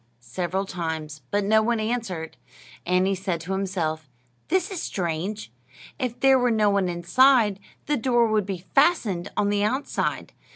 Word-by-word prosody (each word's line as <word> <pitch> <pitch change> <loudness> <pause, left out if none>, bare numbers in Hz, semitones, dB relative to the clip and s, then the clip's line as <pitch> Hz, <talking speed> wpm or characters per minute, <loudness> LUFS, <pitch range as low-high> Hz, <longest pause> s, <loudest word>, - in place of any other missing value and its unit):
several 185 +2 -1
times; 160 -5 -5
but 205 0 0
no 220 +2 +4
one 235 +1 0
answered. 215 -8 -3 0.5
And 180 +1 +3
he 195 - +1
said 185 -3 -2
to 175 +3 -6
himself: 170 -6 -2 0.4
"This 375 +2 0
is 370 - -4
strange! 185 +4 -3 0.5
If 250 -3 -3
there 270 -1 +5
were 250 0 +2
no 215 -3 +3
one 195 -2 +1
inside, 205 +4 +3 0.3
the 295 0 0
door 240 0 +2
would 215 -3 0
be 185 -2 -5
fastened 220 - +2
on 205 - +2
the 205 0 +1
outside. 260 +7 -2
200 Hz, 160 wpm, -24 LUFS, 180-235 Hz, 0.5 s, there